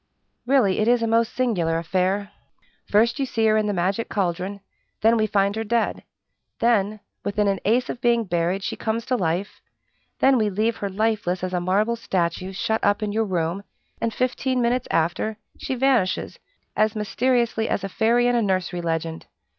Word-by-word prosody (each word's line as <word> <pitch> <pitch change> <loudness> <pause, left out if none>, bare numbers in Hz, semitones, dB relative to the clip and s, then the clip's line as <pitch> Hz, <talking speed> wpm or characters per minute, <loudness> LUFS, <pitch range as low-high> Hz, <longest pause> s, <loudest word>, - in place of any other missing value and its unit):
"Really, 245 -8 +3
it 215 - +1
is 240 -1 +3
a - - +1
most 230 +1 +2
singular 185 -11 +1
affair! 190 +4 -1 0.6
First 230 +4 +3
you 270 - 0
see 225 -3 0
her 215 0 +4
in 215 -1 +1
the - - +1
magic 190 +4 -1
caldron; 195 +1 -2 0.4
then 225 +2 +5
we 215 -1 +2
find 200 -1 +1
her 220 - -2
dead; 230 +1 0 0.6
then, 230 -4 +3
when 215 0 -11 0.2
within 205 0 0
an 195 -1 +1
ace 240 +5 +2
of 245 - -6
being 235 -1 +3
buried, 175 0 -1
she - - -3
comes 225 +1 -2
to 255 - 0
life; 180 -1 -2 0.6
then 265 -2 +4
we 215 -1 +2
leave 215 +4 0
her 200 - -3
lifeless 200 -3 -1
as 185 0 -3
a 180 - 0
marble 205 +6 +1
statue, 185 -4 -2
shut 220 +3 -1
up 205 +1 +2
in 210 - -1
your 220 +1 0
room, 180 0 -2 0.4
and 230 - 0
fifteen 255 +2 -1
minutes 245 +1 +1
after, 175 +6 0 0.2
she 265 - -3
vanishes 250 -7 +1 0.4
as 215 +1 +2
mysteriously 235 +1 0
as 200 - -1
a - - -1
fairy 235 +5 +2
in 245 - +3
a 235 - +3
nursery 185 -3 -1
legend. 165 -1 -3
210 Hz, 185 wpm, -23 LUFS, 185-230 Hz, 0.6 s, then